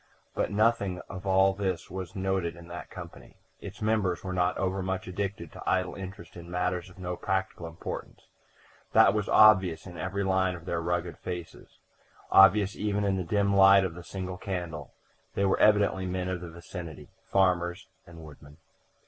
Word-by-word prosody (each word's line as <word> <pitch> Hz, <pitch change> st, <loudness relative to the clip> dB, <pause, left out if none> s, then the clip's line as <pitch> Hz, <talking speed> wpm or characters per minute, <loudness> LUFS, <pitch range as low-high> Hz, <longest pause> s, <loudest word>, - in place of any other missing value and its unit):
But -, -, -1 dB
nothing 100 Hz, -3 st, +1 dB
of 95 Hz, 0 st, -7 dB
all 95 Hz, 0 st, +4 dB
this 95 Hz, -3 st, -3 dB
was 95 Hz, +1 st, -6 dB
noted 95 Hz, -3 st, -1 dB
in 85 Hz, 0 st, -13 dB
that 85 Hz, 0 st, -8 dB
company; -, -, -11 dB, 0.2 s
its 100 Hz, +2 st, -9 dB
members 105 Hz, -5 st, 0 dB
were 95 Hz, -1 st, -4 dB
not 90 Hz, 0 st, +1 dB
overmuch 95 Hz, 0 st, -2 dB
addicted 95 Hz, -3 st, -4 dB
to -, -, -5 dB
idle 95 Hz, -1 st, +1 dB
interest 95 Hz, -3 st, -9 dB
in 85 Hz, 0 st, -10 dB
matters 90 Hz, 0 st, -2 dB
of 95 Hz, -, -17 dB
no 90 Hz, -1 st, -4 dB
practical 95 Hz, -2 st, -2 dB
importance; 80 Hz, 0 st, -7 dB, 0.7 s
that 100 Hz, -, +6 dB
was 105 Hz, -1 st, -1 dB
obvious 95 Hz, -6 st, +5 dB
in 90 Hz, -3 st, -9 dB
every 100 Hz, +2 st, -2 dB
line 95 Hz, -1 st, +1 dB
of 85 Hz, -1 st, -11 dB
their 85 Hz, -2 st, -2 dB
rugged 85 Hz, 0 st, -2 dB
faces 90 Hz, -2 st, -8 dB, 0.5 s
obvious 95 Hz, +1 st, +6 dB
even 105 Hz, -1 st, -1 dB
in 100 Hz, -1 st, +1 dB
the 95 Hz, -, -2 dB
dim 100 Hz, +3 st, +1 dB
light 95 Hz, 0 st, +7 dB
of 90 Hz, -, -3 dB
the 90 Hz, +1 st, -10 dB
single 95 Hz, 0 st, -6 dB
candle. 90 Hz, -5 st, -5 dB, 0.4 s
They 100 Hz, -, +1 dB
were 95 Hz, -, +2 dB
evidently 100 Hz, -3 st, +3 dB
men 90 Hz, 0 st, -2 dB
of 90 Hz, -2 st, -3 dB
the 90 Hz, -, -7 dB
vicinity 85 Hz, -2 st, -9 dB, 0.2 s
farmers 90 Hz, -1 st, +1 dB, 0.2 s
and 85 Hz, -2 st, -12 dB
woodmen. 75 Hz, 0 st, -14 dB
95 Hz, 175 wpm, -28 LUFS, 85-95 Hz, 0.7 s, light